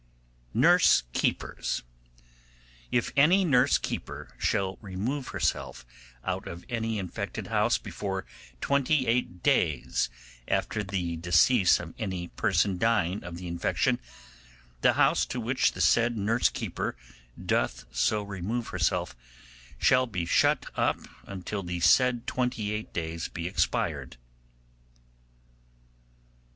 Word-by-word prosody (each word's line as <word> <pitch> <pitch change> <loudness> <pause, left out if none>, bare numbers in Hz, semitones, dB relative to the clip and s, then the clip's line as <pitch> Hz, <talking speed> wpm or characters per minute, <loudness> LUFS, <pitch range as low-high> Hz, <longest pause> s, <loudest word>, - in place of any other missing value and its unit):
Nurse 170 - +5
keepers. - - -1 1.1
'If 120 - +1
any 175 +7 +5
nurse 130 -7 +4
keeper - - -6
shall 95 -1 0
remove 110 +8 -3
herself 65 -2 -2 0.4
out - - -3
of 85 +1 -8
any 115 -2 -1
infected 95 -3 -5
house - - +3
before 95 -4 -5 0.4
twenty 140 0 +2
eight 115 -7 -1
days 75 -6 +1 0.4
after 105 - 0
the 90 -4 -3
decease 90 +5 +4
of 85 -1 -8
any 95 -5 -3
person 95 -2 +1
dying 105 -4 +1
of 85 -1 -7
the 90 0 -7
infection, 85 0 0 0.8
the - - +5
house - - +3
to 125 - -4
which 120 +3 +1
the - - -4
said 120 0 +3
nurse 110 +4 +2
keeper - - -4 0.4
doth - - -1
so 105 - +1
remove 100 +4 -4
herself 85 -7 0 0.6
shall 130 -1 +4
be 90 -6 -3
shut - - +3
up - - +1 0.3
until 100 +1 -5
the 90 -1 -4
said 125 +5 +4
twenty 125 -5 -1
eight 105 0 -4
days 85 0 -3
be 85 0 -5
expired. 90 - -1
100 Hz, 115 wpm, -28 LUFS, 90-120 Hz, 1.1 s, Nurse